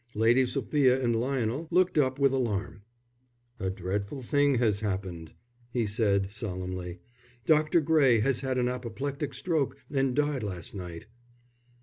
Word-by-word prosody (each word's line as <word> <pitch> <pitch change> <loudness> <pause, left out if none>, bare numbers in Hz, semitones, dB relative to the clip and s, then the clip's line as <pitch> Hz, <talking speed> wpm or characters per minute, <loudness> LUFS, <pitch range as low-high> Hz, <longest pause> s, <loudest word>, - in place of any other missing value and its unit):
Lady 120 +4 +4
Sophia 135 -1 +2
and 120 -3 +1
Lionel 130 +4 -1
looked 180 +1 +3
up 130 -3 +2
with 140 -1 +3
alarm. 110 -6 -2 0.8
"A 95 - -1
dreadful 100 +7 -4
thing 145 +2 +3
has 110 -4 +2
happened," 95 -6 -4 0.4
he 120 -2 0
said, 100 -2 0
solemnly. 90 -4 -4 0.5
"Dr. 155 +1 +4
Gray 140 -7 +4
has 130 +3 +1
had 130 -1 -2
an 125 -1 +2
apoplectic 135 +4 -4
stroke 140 -3 -1
and 135 -2 +1
died 145 -2 +1
last 90 -6 -6
night." 90 -4 -7
125 Hz, 135 wpm, -28 LUFS, 100-140 Hz, 0.8 s, Lady